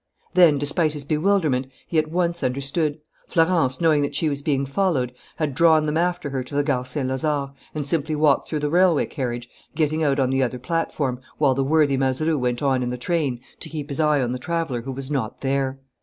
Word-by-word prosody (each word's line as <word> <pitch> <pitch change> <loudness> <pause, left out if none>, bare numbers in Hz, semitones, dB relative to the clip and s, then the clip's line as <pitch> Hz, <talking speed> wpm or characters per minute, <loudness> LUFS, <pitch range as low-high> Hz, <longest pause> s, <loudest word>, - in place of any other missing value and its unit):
Then, 170 -5 +6
despite 145 +2 0
his 145 -2 -5
bewilderment, 155 -4 +1 0.2
he 165 - +1
at 155 0 -1
once 170 0 0
understood. 140 +4 -1 0.3
Florence, 165 -6 +2
knowing 160 -3 +3
that 145 - -2
she 160 - +2
was 140 -1 -3
being 140 -2 0
followed, 135 -5 0 0.2
had 150 -3 -2
drawn 160 +1 +5
them 150 0 -1
after 175 -3 0
her 130 -1 -2
to 125 - -9
the 145 - +2
Gare 135 -4 0
Saint 130 +1 -2
Lazare 140 +1 -1 0.2
and 150 -2 -2
simply 155 +1 -1
walked 150 -2 +3
through 155 -2 -2
the 145 0 -1
railway 175 -3 +4
carriage, 120 -4 -4 0.3
getting 155 0 +1
out 140 -2 +2
on 130 -2 +1
the 135 0 +2
other 125 -1 0
platform, 135 -2 -2 0.2
while 140 -3 +3
the 135 +1 0
worthy 145 -1 +3
Mazeroux 135 +4 +1
went 125 +1 -1
on 135 -2 +2
in 125 - -1
the 125 - -3
train 140 -3 -1 0.2
to - - -6
keep 150 -2 -6
his 140 - -3
eye 150 -3 +3
on 120 - -1
the 125 - -3
traveller 165 -5 -2
who 135 +3 -6
was 135 +2 -5
not 125 -6 -2
there. 135 0 -1
145 Hz, 215 wpm, -23 LUFS, 130-160 Hz, 0.3 s, Then